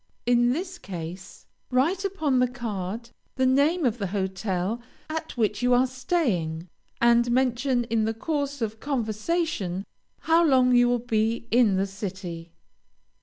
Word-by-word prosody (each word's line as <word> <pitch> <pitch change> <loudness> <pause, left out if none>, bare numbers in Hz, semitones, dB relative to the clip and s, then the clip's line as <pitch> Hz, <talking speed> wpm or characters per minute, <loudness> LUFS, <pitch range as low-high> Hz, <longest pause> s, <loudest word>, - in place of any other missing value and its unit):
In 240 0 +4
this 355 +6 -4
case, 180 0 -8 0.2
write 315 +10 +1
upon 315 -10 0
the 250 - +4
card 230 -2 -5 0.2
the 260 - +2
name 285 +6 +3
of 240 -1 0
the 200 - -1
hotel 190 +2 -2 0.3
at 320 -3 -5
which 215 -2 0
you 245 0 +4
are 250 +1 +4
staying, 245 - -1 0.3
and 235 0 +4
mention 250 0 +1
in 230 -2 0
the 225 - 0
course 285 0 -2
of 220 0 -4
conversation, 225 - -2 0.4
how 330 +1 +4
long 260 -5 +4
you 245 0 +5
will 245 - +2
be 230 -1 -1
in 230 -4 +4
the 190 +1 +1
city. 185 -4 -6
240 Hz, 145 wpm, -26 LUFS, 205-265 Hz, 0.4 s, you